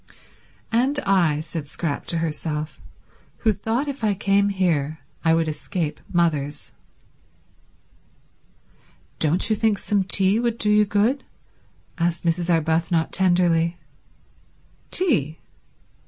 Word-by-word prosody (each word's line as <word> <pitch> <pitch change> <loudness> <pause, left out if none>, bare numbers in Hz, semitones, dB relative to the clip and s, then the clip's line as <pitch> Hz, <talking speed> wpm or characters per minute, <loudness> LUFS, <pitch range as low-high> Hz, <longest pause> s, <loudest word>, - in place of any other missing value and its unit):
"And 260 +5 +2
I," 170 -7 +3
said 155 -1 -6
Scrap 150 0 -4
to 170 - -1
herself, 155 -1 -3 0.7
"who 220 - +5
thought 225 +8 -2
if 280 -4 -5
I 210 -2 +2
came 200 +1 +2
here 160 -6 0 0.3
I 165 0 +4
would 165 -1 +1
escape 155 +1 -3
mothers." 155 -5 0 2.5
"Don't 160 +3 +2
you 215 - +2
think 215 -1 +1
some 200 0 0
tea 195 +2 +2
would 235 -1 0
do 210 -2 +2
you 210 0 +5
good?" 210 +7 +1 0.8
asked 170 +1 0
Mrs. 170 +1 0
Arbuthnot 165 +1 +1
tenderly. 175 -2 +2 1.1
Tea? 180 - 0
175 Hz, 110 wpm, -23 LUFS, 160-210 Hz, 2.5 s, who